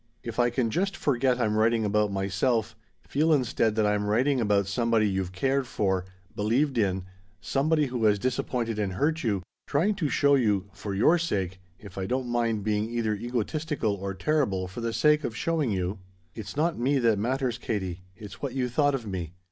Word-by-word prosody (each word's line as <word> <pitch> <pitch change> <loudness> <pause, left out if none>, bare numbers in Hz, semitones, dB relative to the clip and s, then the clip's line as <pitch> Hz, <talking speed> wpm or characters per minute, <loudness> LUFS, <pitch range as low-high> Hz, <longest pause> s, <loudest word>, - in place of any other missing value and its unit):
"If - - -5
I 120 0 +4
can 120 -2 0
just 195 - -1
forget 130 -4 +1
I'm 105 -3 +1
writing 110 +1 +2
about 105 0 +1
myself, 100 +4 0 0.3
feel 155 +3 +2
instead 120 -6 +2
that 110 -1 +2
I'm 105 0 +1
writing 125 +5 +2
about 100 -2 +2
somebody 110 +2 +1
you've 95 -2 -2
cared 135 +7 0
for, 95 -6 0 0.3
believed 120 +5 +1
in, 95 -3 0 0.3
somebody 150 +2 +1
who 125 -4 -1
has 105 -1 +4
disappointed 120 -1 -2
and 100 -3 -1
hurt 155 - 0
you, 100 -6 -1 0.2
trying 170 +9 +2
to 160 -7 0
show 140 +1 +3
you 105 -8 +2
for 100 0 -5
your 155 - +4
sake 95 - -2 0.2
if 100 -1 -10
I 95 - -2
don't 130 +2 -1
mind 115 -3 0
being 105 +1 0
either 115 -2 0
egotistical 120 +3 -2
or 100 -1 -4
terrible 100 -8 0
for 95 +6 -7
the 115 0 -1
sake 150 +5 +3
of 115 -3 -4
showing 160 -6 0
you 95 0 -2 0.3
"It's 105 +2 -8
not 160 0 +1
me 135 +4 +2
that 115 -5 +2
matters, 125 +1 -1
Katie 95 -6 -3
it's 105 -3 -11
what 135 -3 -3
you 125 -2 0
thought 145 +3 +2
of 125 -4 -5
me. 90 -5 -5
115 Hz, 190 wpm, -27 LUFS, 100-135 Hz, 0.3 s, I